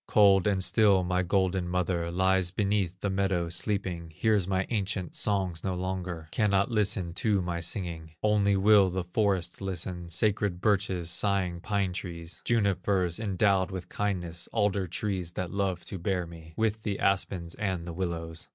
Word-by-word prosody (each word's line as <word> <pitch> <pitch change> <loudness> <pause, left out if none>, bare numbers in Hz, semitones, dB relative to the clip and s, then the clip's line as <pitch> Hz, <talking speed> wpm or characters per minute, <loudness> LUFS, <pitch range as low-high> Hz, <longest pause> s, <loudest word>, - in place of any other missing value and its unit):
Cold 100 -3 +5
and 95 -2 +2
still 100 -3 +4
my 90 +1 +1
golden 95 0 +1
mother 90 -1 -1
Lies 95 +1 +2
beneath 95 -1 -1
the 100 - 0
meadow, 95 -3 0
sleeping, 90 -1 -1
Hears 100 +3 +1
my 95 -1 0
ancient 100 -5 -2
songs 95 -5 0
no 95 -1 -1
longer, 90 -3 -4
Cannot 100 -1 +2
listen 95 -5 +1
to 105 0 +1
my 85 -1 -2
singing; 85 -2 -4
Only 105 -2 +3
will 100 -1 +6
the 90 0 -2
forest 95 0 0
listen, 90 -2 -4
Sacred 100 0 +1
birches, 95 -4 0
sighing 90 -1 0
pine 100 -3 -1
trees, 85 -2 -6
Junipers 95 -5 +1
endowed 100 -2 +2
with 95 -2 -6
kindness, 90 -5 -3
Alder 100 -4 +1
trees 90 -1 -3
that 90 -1 -4
love 95 -3 -1
to 95 - -6
bear 90 0 -1
me, 80 -1 -12
With 110 -1 0
the 105 -2 -2
aspens 95 -3 0
and 95 -5 -2
the 85 - -6
willows. 80 -2 -4
95 Hz, 160 wpm, -28 LUFS, 85-100 Hz, -, will